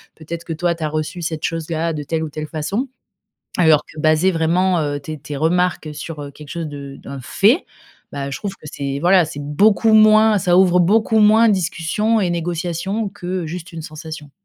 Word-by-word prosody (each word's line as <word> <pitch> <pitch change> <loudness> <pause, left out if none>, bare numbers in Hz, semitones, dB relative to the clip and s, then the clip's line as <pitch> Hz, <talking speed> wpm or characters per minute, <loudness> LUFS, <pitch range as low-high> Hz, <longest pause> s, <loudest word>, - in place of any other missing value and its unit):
Peut-être 165 +1 -7
que 165 - -4
toi, 170 +2 0
tu 165 - -7
as 155 - 0
reçu 155 +3 -4
cette 160 -2 -4
chose-là 165 0 -2
de 150 - -4
telle 160 +2 -2
ou 160 - -4
telle 155 +1 -6
façon. 190 - -3 0.7
Alors 155 -4 +4
que 155 - -10
baser 155 +4 +3
vraiment, 175 +2 +1
heu, 145 -1 -2
tes 155 +1 -7
tes 145 0 -7
remarques 165 +1 0
sur, 150 +1 -7
heu, 140 - -7
quelque 150 +1 -13
chose 170 -2 -4
de 140 -1 -9
un 140 -1 -6
fait. 220 - +2 0.5
Bah, 140 -1 -4
je - - -5
trouve 200 -2 -4
que 190 - -22
c'est, 140 0 -4
voilà, 180 +1 +5
c'est 145 -2 -7
beaucoup 205 +9 +3
moins 215 0 +6
ça 180 -1 +2
ouvre 180 -1 +5
beaucoup 220 +4 +3
moins 220 +2 +6
discussions 195 +4 0
et 180 -3 0
négociations 175 +5 -2
que 185 -3 -4
juste 175 +2 -7
une 165 -1 -7
sensation. 155 -1 -9
165 Hz, 200 wpm, -19 LUFS, 155-190 Hz, 0.7 s, moins